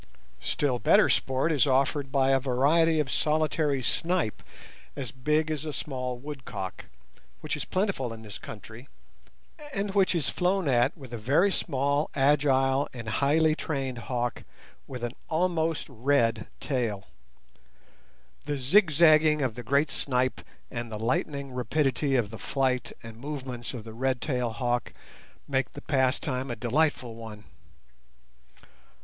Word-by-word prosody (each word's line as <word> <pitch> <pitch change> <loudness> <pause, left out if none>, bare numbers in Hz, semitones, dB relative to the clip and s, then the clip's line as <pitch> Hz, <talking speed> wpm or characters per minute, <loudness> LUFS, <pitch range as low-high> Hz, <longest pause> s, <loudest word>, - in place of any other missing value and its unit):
Still 130 -4 0
better - - +5
sport 135 +5 +1
is 145 -3 +3
offered 135 +1 +1
by 135 -1 +3
a 135 - +4
variety 150 +5 +3
of 140 -4 -1
solitary 150 -3 +1
snipe 165 - 0 0.5
as 135 -6 -4
big 150 +5 0
as 155 -1 -2
a 155 - -4
small 130 -3 -4
woodcock, 125 -9 -7 0.6
which - - -2
is - - -4
plentiful 185 - -1
in 110 0 -9
this 105 -1 -9
country, 110 +4 -10 0.8
and 200 -4 -2
which 195 -2 +3
is 155 -5 0
flown 185 -1 +1
at 120 +1 +2
with 130 -5 -11
a 120 - -4
very 145 - +3
small, 140 -2 0
agile, 135 -1 +3
and 115 -3 -6
highly 155 +3 +4
trained 135 -6 -3
hawk 120 0 -3 0.4
with 125 -2 -7
an 120 - -1 0.2
almost 165 -1 0
red 120 -3 +1
tail. 115 -8 -2 1.4
The 145 -1 -2
zigzagging 155 0 +5
of 130 -4 0
the 125 - -7
great 140 +5 +2
snipe 130 -1 0 0.3
and 120 -2 -5
the 110 - -4
lightning 135 +5 -1
rapidity 135 +1 0
of 115 -5 +1
the 115 - -8
flight 130 -3 0
and 115 -1 -10
movements 130 -3 -5
of 115 - -7
the 110 0 -9
red 130 +2 0
tailed 125 -5 -1
hawk 120 -1 -1 0.5
make 135 -1 -1
the 145 - -8
pastime 130 -1 0
a 120 - -2
delightful 125 -1 0
one. 110 -2 -9
135 Hz, 140 wpm, -28 LUFS, 120-150 Hz, 1.4 s, better